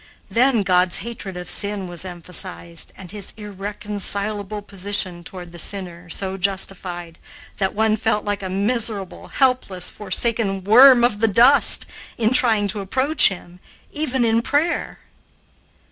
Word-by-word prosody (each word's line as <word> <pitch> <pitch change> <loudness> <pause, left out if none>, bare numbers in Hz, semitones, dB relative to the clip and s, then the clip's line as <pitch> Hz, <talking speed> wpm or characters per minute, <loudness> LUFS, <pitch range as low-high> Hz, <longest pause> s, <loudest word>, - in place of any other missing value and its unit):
Then 240 -2 +3
God's 180 -1 +2
hatred 205 -6 -7
of 180 -1 -7
sin 205 0 -1
was 175 0 -4
emphasized 175 -1 -3
and 185 -2 -10
his 205 -2 -4
irreconcilable 205 0 -4
position 195 -3 -4
toward 175 0 -10
the 175 - -10
sinner 180 -1 -2
so 190 +2 -4
justified 180 -3 -2 0.4
that 190 0 -1
one 220 0 +2
felt 210 -1 0
like 205 0 -2
a 190 - -5
miserable, 205 0 -2
helpless, 255 -9 0
forsaken 205 -1 -2
worm 245 +4 +7
of 215 -4 +2
the 225 - +3
dust 240 +7 +5 0.3
in 225 -1 +1
trying 220 -5 +3
to 210 - -2
approach 260 +10 +3
him, 180 -2 -10 0.3
even 265 -5 -1
in 225 0 +2
prayer. 295 +7 -1
200 Hz, 135 wpm, -21 LUFS, 185-225 Hz, 0.4 s, worm